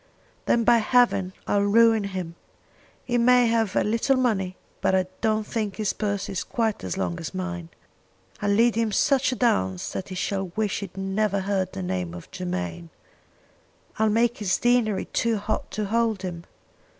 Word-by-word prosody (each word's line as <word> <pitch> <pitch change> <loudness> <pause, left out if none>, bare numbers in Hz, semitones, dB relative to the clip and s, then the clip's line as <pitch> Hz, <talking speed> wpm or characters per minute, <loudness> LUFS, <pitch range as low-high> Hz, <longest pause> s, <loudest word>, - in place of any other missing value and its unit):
"Then 235 - +3
by 235 +1 +5
heaven 225 -5 +3
I'll 205 - +2
ruin 220 +1 +4
him. 185 -4 -5 0.7
He 245 -1 +1
may 250 +1 +5
have 225 -3 +1
a - - +3
little 230 +6 +2
money, 195 -7 0 0.2
but 190 -1 +2
I 185 -1 +2 0.2
don't 215 -1 +1
think 210 -4 -3
his 210 -1 -1
purse 205 -2 -2
is 195 - -3
quite 225 -3 -1
so 95 - -4
long 90 -2 -2
as 165 - -6
mine. 175 -2 -4 0.7
I'll 205 - 0
lead 230 +3 +4
him 225 -1 0
such 275 +5 +2
a - - -1
dance 95 - 0
that 190 - -5
he 185 - -6
shall 190 +1 -2
wish 215 -2 0
he 200 - -5
had - - -22
never 195 +1 0
heard 190 -1 -1
the 95 - -4
name 90 -1 -3
of 85 - -11
Germain. 90 -2 -4 1.1
I'll 220 0 +3
make 235 +2 +2
his 195 -3 +1
deanery 240 -5 +2
too 230 -1 0
hot 205 +2 -3
to 215 - -2
hold 220 -2 0
him. 170 -2 -5
205 Hz, 180 wpm, -25 LUFS, 185-230 Hz, 1.1 s, by